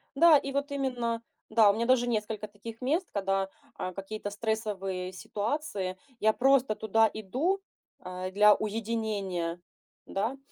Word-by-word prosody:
Да. 325 0 +8
И 275 0 -3
вот 280 +1 -1
именно, 245 -4 -1 0.3
да, 220 -2 +6
у - - +5
меня 230 +2 -1
даже 245 -1 +3
несколько 215 -2 -2
таких 220 +3 -10
мест, 320 +9 +1
когда, 195 -1 0 0.3
а, 185 - -4
какие-то 205 +2 -5
стрессовые 200 -4 -2
ситуации, 205 - -3 0.2
я 220 0 +4
просто 265 -3 +3
туда 220 +1 +3
иду, 260 - 0 0.4
а, 185 0 -5
для 210 +1 +7
уединения. 205 -6 -2 0.5
Да? 220 +7 -2
220 Hz, 135 wpm, -29 LUFS, 195-245 Hz, 0.5 s, Да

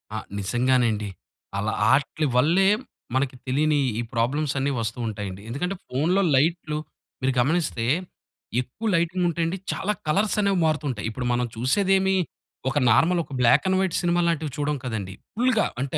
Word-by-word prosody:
ఆ! - - -1 0.2
నిజంగానండి. 115 -1 +1 0.5
అలా 105 +2 -1 0.2
ఆట్లి 150 +2 +1
వల్లే 170 +9 +4 0.5
మనకు 130 -1 0
తెలీని 150 +3 +2 0.2
ఈ - - +1
ప్రాబ్లమ్స్ 135 +5 0
అన్నీ 140 +1 0
వస్తూ 115 +2 -3
ఉంటాయండి. 100 -3 -5
ఎందుకంటే 180 +10 -2
ఫోనులో 165 +9 +1
లైట్లు 155 +1 +1 0.4
మీరు 130 0 +1
గమనిస్తే 140 -4 +1 0.8
ఎక్కువ 130 - -6
లైటింగ్ 175 +2 +1
ఉంటే 170 0 -2
అండి. 175 +3 -2
చాలా 210 +2 -1
కలర్స్ 200 +7 +2
అనేవి 195 -2 +2
మారుతూంటాయి. 145 -8 -1
ఇప్పుడు 125 +3 -5
మనం 125 0 +1
చూసేదేమి 190 - +2 0.5
ఒక 135 - -2
నార్మల్ 170 +9 +4
ఒక - - -19
బ్లాక్ 125 +4 +5
అండ్ 190 0 +2
వైట్ 190 -3 0
సినిమా 175 0 +2
లాంటివి 160 -3 -1
చూడం 145 0 0
కదండీ. 110 -6 -4 0.2
ఫుల్‌గా 240 -2 +2 0.2
అంటే, 140 +3 -2
145 Hz, 150 wpm, -24 LUFS, 125-175 Hz, 0.8 s, బ్లాక్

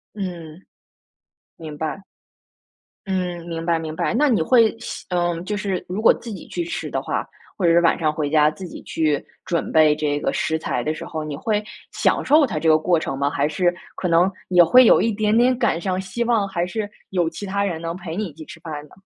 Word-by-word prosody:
嗯。 175 -4 -7 0.9
明 155 -3 -8
白。 160 +5 -4 1.1
嗯， 180 -3 -2
明 165 -1 -5
白 170 -1 +2
明 160 -1 -5
白， - - -1
那 290 +5 +3
你 225 -9 +2
会 225 +5 +4
希 - - -7
嗯， 175 -1 -1
就 210 +3 -3
是 200 -3 -2
如 190 +4 -3
果 225 - +6
自 235 - -9
己 190 - -9
去 345 - -3
吃 330 -1 -4
的 - - -2
话， - - -3 0.3
或 190 - 0
者 165 - +5
是 170 - +5
晚 170 - +3
上 155 -2 +2
回 150 -2 -2
家 150 0 +4
自 185 +5 -8
己 175 - -9
去 155 -3 0 0.2
准 170 -2 -2
备 155 -1 +6
这 150 -1 -1
个 - - 0
食 190 -4 -1
材 160 - -2
的 155 - -1
时 155 - -8
候， 160 - -5
你 155 -1 -5
会 210 +6 -1 0.3
享 - - +1
受 300 0 +5
它 190 - -4
这 160 +1 +1
个 155 - +6
过 170 +2 +2
程 145 -4 -3
吗？ 140 +1 +1
还 145 0 0
是 175 +3 +1 0.2
可 185 - -2
能 175 +3 +3 0.2
也 180 -1 +6
会 250 +10 +7
有 - - +6
一 230 - +1
点 215 +1 +1
点 250 +1 +4
感 230 -9 +1
伤， 185 -1 -1
希 190 +5 -3
望， 230 -4 +1
还 175 -3 -1
是 205 +2 -4 0.2
有 175 -3 0
其 185 +5 -7
他 200 +1 -1
人 170 -5 -3
能 165 0 -3
陪 175 -3 -7
你 210 +3 -2
一 160 - -12
起 155 +1 -11
吃 - - -11
饭 155 -3 -6
呢？ - - -22
175 Hz, 250 characters per minute, -22 LUFS, 160-205 Hz, 1.1 s, 会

